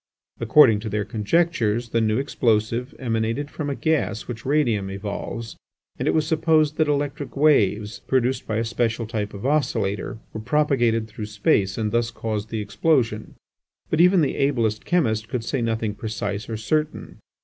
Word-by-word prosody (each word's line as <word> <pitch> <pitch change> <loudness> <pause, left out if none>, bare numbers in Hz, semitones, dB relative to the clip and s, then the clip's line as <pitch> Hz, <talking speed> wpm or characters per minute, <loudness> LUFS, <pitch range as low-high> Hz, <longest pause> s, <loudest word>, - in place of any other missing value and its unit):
According 115 -2 +6
to 110 +1 -5
their 105 0 -1
conjectures 115 0 0
the 115 +1 +1
new 110 0 +1
explosive 120 -2 0
emanated 115 +4 -2
from 145 -2 -4
a 140 - -2
gas 150 -10 -1
which 120 0 -7
radium 120 -10 +1
evolves, 105 +3 -5 0.4
and - - -1
it - - +3
was 155 -1 +2
supposed 155 -1 +2
that 155 -1 +2
electric 145 0 -2
waves, 110 -7 +2
produced 130 0 0
by 110 - -2
a 115 - 0
special 115 0 -1
type 105 -2 -3
of 100 +3 -8
oscillator, 110 -10 0 0.2
were 110 - -5
propagated 120 -4 +1
through 105 0 -7
space 100 -2 +1
and 110 -2 -1
thus 120 0 +1
caused 110 -2 -4
the 110 -1 -3
explosion. 115 0 0 0.6
But 155 - +3
even 180 0 +5
the 145 - 0
ablest 120 -6 0
chemist 110 -11 +1
could 120 -2 -2
say 130 +2 -2
nothing 115 -2 -1
precise 105 -1 -4
or 110 - -3
certain. 150 +8 -2
115 Hz, 165 wpm, -23 LUFS, 110-145 Hz, 0.6 s, According